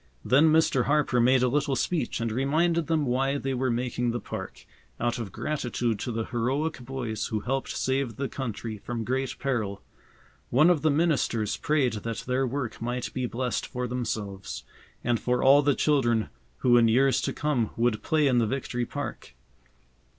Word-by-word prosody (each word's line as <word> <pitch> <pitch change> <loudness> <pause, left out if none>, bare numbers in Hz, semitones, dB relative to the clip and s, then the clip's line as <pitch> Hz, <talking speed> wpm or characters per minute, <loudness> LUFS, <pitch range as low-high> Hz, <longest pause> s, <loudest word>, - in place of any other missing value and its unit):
Then 150 +5 +5
Mr. 155 -5 +3
Harper 145 -4 +2
made 125 +1 +4
a - - +4
little 140 +1 +1
speech 155 -5 -1
and 115 -1 -1
reminded 155 +7 +1
them 160 -3 +1
why 135 +2 +1
they 135 -1 -2
were 130 0 0
making 120 0 -1
the 120 +1 -1
park, - - -7 0.3
out 120 0 -1
of 105 -5 -5
gratitude 120 -6 -2
to 120 - -3
the 115 -1 -2
heroic 130 +6 -1
boys 120 -3 -4
who 110 -1 -2
helped 135 +4 -2
save 130 -3 -1
the 140 +3 -2
country 115 -5 -5
from 115 +2 -4
great 130 +3 -2
peril. 110 -8 -2 0.7
One 150 +8 +5
of 160 -5 +1
the 155 - +3
ministers 140 -9 +1
prayed 145 -6 +1
that 115 0 -4
their 130 +1 +1
work 130 -3 -4
might 120 +1 -3
be 130 -1 -1
blessed 125 +1 -2
for 125 0 -3
themselves, 100 - -4 0.4
and 120 -1 +1
for 125 0 0
all 140 +2 +7
the 145 -1 +2
children 120 -7 +2 0.3
who 120 -1 +5
in 115 -1 +5
years 130 +4 +3
to - - -1
come 140 -7 0
would 115 -2 +1
play 155 -2 +2
in 125 -3 +4
the 115 - +2
Victory 120 -1 -2
Park. - - -6
125 Hz, 180 wpm, -27 LUFS, 115-140 Hz, 0.7 s, all